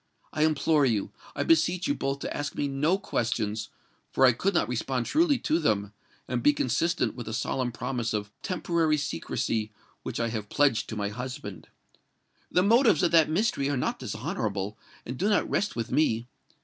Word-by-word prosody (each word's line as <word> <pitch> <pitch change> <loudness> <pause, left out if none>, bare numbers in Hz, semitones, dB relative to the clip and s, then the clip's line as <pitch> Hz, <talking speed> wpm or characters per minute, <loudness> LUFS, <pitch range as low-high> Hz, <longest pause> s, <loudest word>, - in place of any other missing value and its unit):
I 155 0 +3
implore 155 -1 +2
you—I 110 -7 -2
beseech 170 +2 +2
you 285 - +2
both 135 - -2
to - - -4
ask 145 0 -3
me 145 - -1
no 145 +7 +1
questions; 110 - -2 0.4
for 130 - +4
I 130 - +7
could 185 - -1
not - - +2
respond 125 0 -2
truly 310 -2 +3
to 165 -8 0
them, 105 -8 0 0.3
and 125 -1 -1
be 145 - +5
consistent 145 +6 0
with 120 -3 -8
a 110 - -3
solemn 125 +2 -1
promise 120 -1 -3
of 105 -1 -3
temporary 170 -4 +1
secrecy 110 - -2 0.3
which - - -5
I 115 0 0
have 110 -2 -5
pledged 140 -6 +2
to - - -4
my 100 -1 -2
husband! 105 -6 -7 0.8
The 180 - +3
motives 225 - +4
of 170 - +3
that 165 -2 +5
mystery 155 -5 +1
are 140 - 0
not - - -1
dishonourable, 110 - -3 0.3
and 125 +1 -6
do 200 - +2
not 210 - +2
rest 205 - -1
with 115 0 -3
me. 115 -7 +2
135 Hz, 180 wpm, -27 LUFS, 110-165 Hz, 0.8 s, I